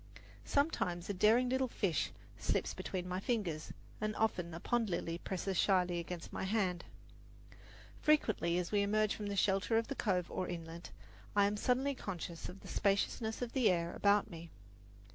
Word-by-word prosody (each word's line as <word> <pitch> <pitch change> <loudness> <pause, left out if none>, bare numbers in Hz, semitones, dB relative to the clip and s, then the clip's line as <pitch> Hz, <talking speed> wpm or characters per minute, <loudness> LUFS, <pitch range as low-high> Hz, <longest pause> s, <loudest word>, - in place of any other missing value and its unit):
Sometimes 200 - 0
a - - -2
daring 220 +6 +4
little 260 +1 +1
fish 190 - 0 0.3
slips - - -1
between 180 -1 -4
my 180 0 -2
fingers, 190 -9 -2 0.3
and 215 0 -1
often 180 -6 0
a 165 - -6
pond 235 +2 0
lily 170 -1 -2
presses 190 0 -2
shyly 180 -3 +3
against 170 0 -6
my - - -3
hand. 190 -3 0 1.1
Frequently, 215 - +2
as 180 -1 -2
we 205 -1 +3
emerge 210 +1 +2
from 210 - -5
the 200 - -2
shelter 195 +3 +2
of 230 +4 -1
a - - -1
cove 180 -7 0
or 185 - -2
inlet, 165 0 -6 0.5
I 200 -1 +6
am 205 +1 +1
suddenly 260 +6 +1
conscious 175 -8 -5
of 185 +2 -10
the - - -11
spaciousness 220 +3 0
of 240 - -4
the 255 -4 +4
air 170 -2 0
about 205 0 +3
me. 170 -4 -9
195 Hz, 170 wpm, -35 LUFS, 175-220 Hz, 1.1 s, I